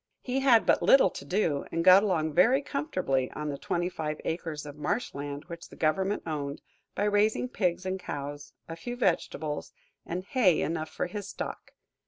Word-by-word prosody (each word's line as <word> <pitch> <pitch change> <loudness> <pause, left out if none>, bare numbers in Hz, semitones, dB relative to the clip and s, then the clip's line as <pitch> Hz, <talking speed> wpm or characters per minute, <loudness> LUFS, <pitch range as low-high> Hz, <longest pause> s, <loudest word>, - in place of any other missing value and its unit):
He 255 +1 -1
had 255 -4 +5
but - - +3
little 265 -9 +6
to - - -8
do, 155 -2 0
and 165 - -1
got 185 +1 +9
along 160 -7 0
very 245 - +4
comfortably 185 - -1
on 150 0 -4
the 140 - -3
twenty 175 0 -1
five 155 -4 -4
acres 160 -3 -3
of 145 -1 -8
marsh 205 +10 -2
land 145 +1 -6
which 170 -1 -9
the - - -13
government 190 +6 0
owned, 145 -3 -3 0.4
by 200 - 0
raising 210 +3 +2
pigs 185 -6 -1
and 190 0 -2
cows, 145 -3 -6 0.2
a 165 - -6
few 240 +9 -6
vegetables, 160 - -1 0.3
and 180 +2 -4
hay 200 - +3
enough 160 0 -2
for - - -3
his 200 +2 -6
stock. - - -6
175 Hz, 185 wpm, -29 LUFS, 150-205 Hz, 0.4 s, got